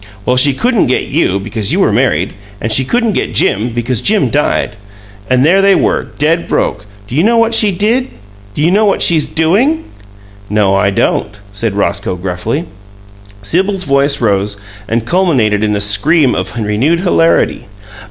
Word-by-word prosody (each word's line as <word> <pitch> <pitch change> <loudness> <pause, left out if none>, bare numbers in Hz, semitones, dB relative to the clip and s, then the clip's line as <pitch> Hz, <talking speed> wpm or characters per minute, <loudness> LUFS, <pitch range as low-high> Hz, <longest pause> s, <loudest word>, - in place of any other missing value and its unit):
"Well, 125 - +1
she 140 +2 +4
couldn't 240 - +1
get 130 - 0
you, 115 - 0
because 105 0 -4
you - - 0
were - - +2
married, 85 +6 0 0.3
and 110 - -3
she 130 +4 +3
couldn't 230 - 0
get - - -3
Jim, 110 +5 +1
because 120 0 -2
Jim 200 - +1
died. 150 +1 0 0.6
And 130 +1 +3
there 190 +5 +4
they 195 0 +4
were, - - 0
dead 165 +3 0
broke! 105 0 -2 0.2
Do - - -9
you 150 - +2
know 230 +5 +2
what 230 0 +2
she 215 -2 +3
did? 225 +8 0 0.5
Do 150 - -1
you 170 - +3
know 210 +3 +3
what 200 - +1
she's 160 -3 +2
DOING?" 230 - +1 0.7
"No, 105 -2 +1
I 100 +1 +2
don't," 105 +1 -1
said 100 +1 -3
Roscoe, 100 -2 -1
gruffly. 95 - -3 0.8
Sibyl's 190 - -1
voice 140 -1 +1
rose 105 -2 0 0.3
and 115 +1 -1
culminated 125 - +1
in 105 -1 0
a - - -1
scream 125 +8 +3
of 90 +2 -4
renewed 115 +11 0
hilarity. 165 - +1
130 Hz, 170 wpm, -13 LUFS, -, 0.8 s, she